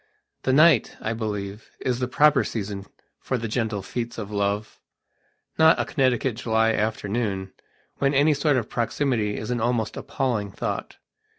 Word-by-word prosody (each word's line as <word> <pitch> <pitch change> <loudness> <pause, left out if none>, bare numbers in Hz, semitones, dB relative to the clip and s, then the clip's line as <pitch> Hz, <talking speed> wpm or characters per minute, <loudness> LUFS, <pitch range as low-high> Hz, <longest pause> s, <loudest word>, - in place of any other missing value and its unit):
The 130 - +1
night, 155 +5 +5
I 110 - -2
believe, 105 -2 -4
is 125 -1 -1
the 125 - 0
proper 145 +3 +4
season 100 -2 -4 0.3
for 130 - -2
the 115 -1 -3
gentle 110 -3 -2
feats 120 +3 -4
of 105 -2 -5
love, 100 +1 -1 0.8
not 160 0 +6
a - - +1
Connecticut 130 -4 +1
July 110 -1 +2
afternoon, 105 -2 -2 0.4
when 140 0 +1
any 145 +3 +5
sort 145 -1 +2
of 115 -4 -1
proximity 115 -3 -1
is 110 +3 -4
an 120 -2 -1
almost 120 -1 0
appalling 110 -7 -2
thought. - - -4
115 Hz, 155 wpm, -25 LUFS, 105-130 Hz, 0.8 s, not